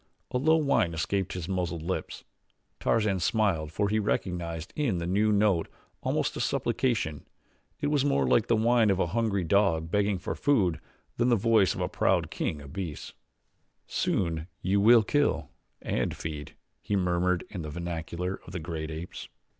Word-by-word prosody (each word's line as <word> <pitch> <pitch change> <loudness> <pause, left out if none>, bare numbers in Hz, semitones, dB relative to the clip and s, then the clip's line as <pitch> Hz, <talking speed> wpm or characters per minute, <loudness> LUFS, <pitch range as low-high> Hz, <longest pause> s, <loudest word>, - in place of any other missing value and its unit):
A 125 - 0
low 160 +4 +4
whine 140 - +2
escaped 95 +4 -1
his 90 -3 -5
muzzled 90 -4 -2
lips. 90 +3 -4 0.6
Tarzan 105 -4 +1
smiled 90 -5 +1
for 100 +5 0
he 110 +2 +1
recognized 85 -5 -2
in 135 -11 0
the 85 - -3
new 105 +4 +2
note 100 -5 +2 0.3
almost - - 0
a - - -4
supplication 110 - 0 0.6
it - - 0
was 145 -2 +2
more 140 -1 +2
like 115 - +3
the 115 - +3
whine 115 0 +3
of 95 -1 +2
a - - +3
hungry 110 -5 +1
dog 80 -3 +2
begging 105 -1 +2
for 90 - -4
food 100 - +2 0.4
than 120 +1 +2
the 120 - +5
voice 110 -2 +3
of - - -4
the - - +1
proud - - +1
king 75 -2 -3
of 70 - -11
beasts. 90 -7 -5 0.7
"Soon 80 -3 -1 0.2
you 100 +2 +2
will 115 +2 +7
kill 145 +6 +1 0.3
and - - -1
feed," 75 -2 -6 0.3
he 105 - -1
murmured 90 -1 +1
in 95 - -5
the 75 - -5
vernacular 85 +3 -4
of 90 - -10
the 90 - -3
great 80 -1 -5
apes. 80 +3 -7
95 Hz, 170 wpm, -28 LUFS, 85-110 Hz, 0.7 s, will